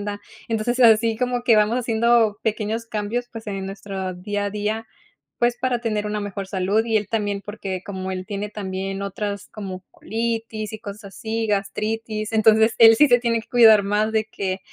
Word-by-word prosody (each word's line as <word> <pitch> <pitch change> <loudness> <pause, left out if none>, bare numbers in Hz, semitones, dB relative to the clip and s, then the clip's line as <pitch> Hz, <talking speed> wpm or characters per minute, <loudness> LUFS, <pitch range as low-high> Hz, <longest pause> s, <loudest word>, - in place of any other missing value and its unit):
esplenda. - - -15 0.3
Entonces, 235 +3 -1
eh, - - +6
así 225 0 +5
como 245 -1 -1
que 230 -3 +5
vamos 215 +3 +3
haciendo 230 -2 +2
pequeños 220 +1 -2
cambios, 225 +3 -3
pues 225 -1 -8
en 195 -2 -4
nuestro 195 -1 -5
día 205 +2 -3
a - - -1
día, 210 +2 -3 0.5
pues 240 0 +1
para 255 -2 0
tener 215 -3 -2
una 210 0 -2
mejor 200 -1 -5
salud 195 +3 +1
y 225 -1 +2
él 210 -2 -3
también, 205 -3 -1
porque 195 -3 -6
como 190 -1 -5
él 185 0 -5
tiene 205 +1 -4
también 195 -1 -4
otras 200 +1 -4
como 190 -3 -7
colitis 225 -1 -3
y 215 - -6
cosas 210 -1 -9
así, 225 +3 -4
gastritis. 215 +2 -2
Entonces 220 +1 +5
él 225 -1 +9
sí 295 +5 +6
se 245 -1 +5
tiene 230 -1 0
que 220 - -21
cuidar 220 -4 +7
más 210 +2 0
de 220 0 +1
que, 195 -3 -4
215 Hz, 190 wpm, -22 LUFS, 200-225 Hz, 0.5 s, él